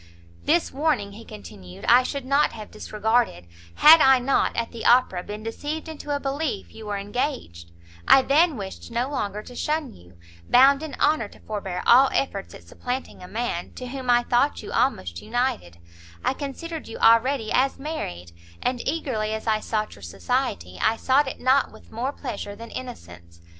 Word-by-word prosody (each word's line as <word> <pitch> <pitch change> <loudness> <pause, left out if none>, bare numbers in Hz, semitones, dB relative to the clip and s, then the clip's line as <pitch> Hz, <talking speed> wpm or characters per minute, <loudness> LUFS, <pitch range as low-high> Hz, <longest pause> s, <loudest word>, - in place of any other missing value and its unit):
"This 335 +3 +2
warning," 275 -8 0
he 220 +3 -11
continued, 90 - -11
"I 245 +2 +7
should 275 +1 -4
not 280 +3 +2
have 215 -2 -9
disregarded, 215 - -1 0.3
had 315 +1 +8
I 265 0 +7
not, 255 +2 +1
at 235 -1 -2
the 230 - -8
Opera, 240 -7 +4
been 210 +3 -8
deceived 295 +8 -5
into 310 -2 -9
a - - -2
belief 275 -6 -3
you 220 -1 -10
were 205 -1 -2
engaged; 200 - -4 0.4
I 270 - +7
then 305 +2 +3
wished 195 -2 -7
no 240 +4 -2
longer 210 -6 -3
to 245 - -12
shun 300 -1 -2
you; 90 0 -18 0.3
bound 275 +3 +6
in 315 -2 -6
honour 295 -7 +2
to - - -18
forbear 195 -4 -5
all 265 +3 +7
efforts 200 -8 -2
at - - -13
supplanting 245 - -6
a 180 - -9
man, 220 -5 -3
to 250 -1 -7
whom 260 -1 -6
I 240 0 +5
thought 245 +5 +1
you - - -8
almost 90 - 0
united, 225 - -2 0.5
I - - +2
considered 310 +4 -6
you 225 - -7
already 230 0 +3
as 265 +2 +2
married, 90 - -6 0.3
and 250 -1 -1
eagerly 240 -9 -1
as 220 - -7
I 220 -1 +2
sought 215 0 -2
your 100 - -15
society, 90 0 -3
I 225 +1 +2
sought 270 +4 +2
it 265 - -6
not 260 +2 +3
with - - -17
more 245 +5 -2
pleasure 205 -8 -6
than 230 +2 -10
innocence. 85 - -9
240 Hz, 180 wpm, -24 LUFS, 205-275 Hz, 0.5 s, had